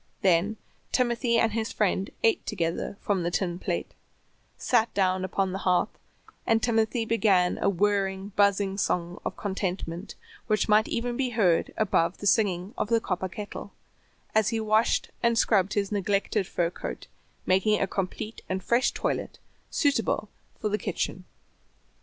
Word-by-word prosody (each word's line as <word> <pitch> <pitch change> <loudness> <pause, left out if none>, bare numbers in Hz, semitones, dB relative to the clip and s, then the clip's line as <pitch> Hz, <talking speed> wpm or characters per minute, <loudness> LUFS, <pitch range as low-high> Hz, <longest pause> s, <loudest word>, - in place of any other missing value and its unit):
Then 190 +4 +3 0.3
Timothy 240 -1 +2
and 225 -1 +3
his 225 +1 -2
friend 195 -2 0
ate 225 - +3
together 170 0 -2
from 200 -3 0
the 170 - 0
tin 175 -1 -1
plate, - - -3 0.6
sat 235 -2 +2
down 185 -1 +2
upon 190 0 0
the 190 - -3
hearth, 180 -2 +1 0.5
and 225 -1 +4
Timothy 225 0 +1
began 200 -6 +2
a - - +2
whirring, 195 0 0
buzzing 200 -1 +2
song 175 -2 -1
of - - -4
contentment 190 -2 -4 0.3
which 215 -1 +1
might 215 0 +5
be 245 +2 -1
heard 200 -8 +3
even 220 - -1
above 180 -3 +1
the - - -8
singing 195 -1 +2
of - - -1
the 230 -1 +4
copper 185 -3 -2
kettle, 205 +3 -7 0.6
as 215 -1 +3
he 225 -1 -1
washed 215 +1 +2
and 235 -1 +2
scrubbed 200 -4 +3
his 200 -1 0
neglected 200 0 0
fur 170 -1 0
coat, - - -6 0.4
making 190 +3 +3
a - - +2
complete 195 +3 -4
and 190 0 -2
fresh 235 +2 +2
toilet - - -2 0.3
suitable 230 - +1 0.3
for 215 - -1
the 210 +1 0
kitchen. - - -3
205 Hz, 155 wpm, -27 LUFS, 185-220 Hz, 0.6 s, might